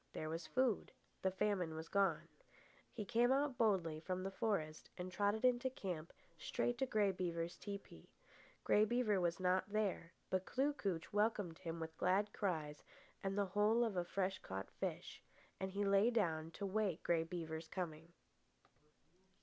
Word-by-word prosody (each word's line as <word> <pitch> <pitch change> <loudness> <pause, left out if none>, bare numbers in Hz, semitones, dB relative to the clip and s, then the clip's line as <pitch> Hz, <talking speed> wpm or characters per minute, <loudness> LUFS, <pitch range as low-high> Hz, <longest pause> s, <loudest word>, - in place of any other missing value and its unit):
There 155 - -3
was 165 +1 -4
food. 255 -5 +1 0.3
The 190 - +3
famine 185 -4 0
was 160 +1 -5
gone. 195 -5 +2 0.6
He 215 - -5
came 240 +3 +3
out 275 0 +2
boldly 185 -9 +2
from 185 +3 -3
the 195 - -2
forest 190 -7 -1
and 180 0 -4
trotted 205 +5 +1
into 250 +1 +3
camp 180 -10 -5 0.3
straight 240 +9 -1
to 265 - +1
Grey 210 -5 +3
Beaver's 170 -2 -2
tepee. 200 - -8 0.5
Grey 210 - +5
Beaver 215 -3 +2
was 170 0 +1
not 185 +2 +2
there; 200 -5 0 0.2
but 185 -1 +2
Kloo 275 +7 +1
kooch 195 - -3
welcomed 205 -5 +1
him 165 -2 -4
with 160 0 -5
glad 200 +3 +2
cries 155 -7 -2 0.4
and 195 0 -1
the 200 - +3
whole 210 +5 +3
of 225 -4 0
a 180 - +1
fresh 190 +1 -1
caught 95 0 -6
fish, - - -4 0.4
and 190 0 -2
he 200 +2 -1
lay 200 +3 +5
down 165 -9 +1
to 200 - -4
wait 195 -3 0
Grey 165 -1 +3
Beaver's 165 -1 -5
coming. 165 -2 -5
190 Hz, 165 wpm, -39 LUFS, 165-210 Hz, 0.6 s, Grey